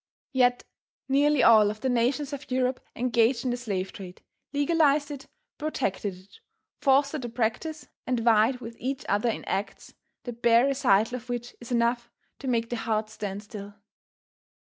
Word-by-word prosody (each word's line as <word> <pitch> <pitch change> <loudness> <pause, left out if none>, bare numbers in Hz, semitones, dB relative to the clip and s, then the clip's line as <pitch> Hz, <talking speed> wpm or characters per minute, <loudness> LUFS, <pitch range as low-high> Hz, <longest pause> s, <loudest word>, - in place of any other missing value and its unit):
Yet 250 -1 +3 0.4
nearly 285 0 +3
all 215 -3 +7
of 215 +1 -6
the - - 0
nations 255 +4 0
of 285 +1 -7
Europe 255 0 0 0.2
engaged 235 0 +2
in 250 - +1
the - - 0
slave 195 -6 -3
trade, 185 -2 -10 0.3
legalized 290 0 +2
it, 275 -1 -8 0.3
protected 205 -10 -2
it, 185 - -19 0.4
fostered 280 +1 +3
the 240 - -5
practice, 245 +7 -2 0.2
and 250 -1 +1
vied 230 +2 +3
with 230 0 -8
each 265 +2 -3
other 205 +4 +1
in - - -4
acts, 195 +1 -4 0.3
the 245 - -5
bare 235 +1 +4
recital 245 -4 +2
of 250 0 -13
which 240 0 -4
is 240 - -10
enough 235 0 +1 0.3
to 275 - -7
make 230 -2 0
the 240 - -1
heart 215 -1 -1
stand 205 -2 -5
still. 205 -1 -9
240 Hz, 165 wpm, -27 LUFS, 220-265 Hz, 0.4 s, all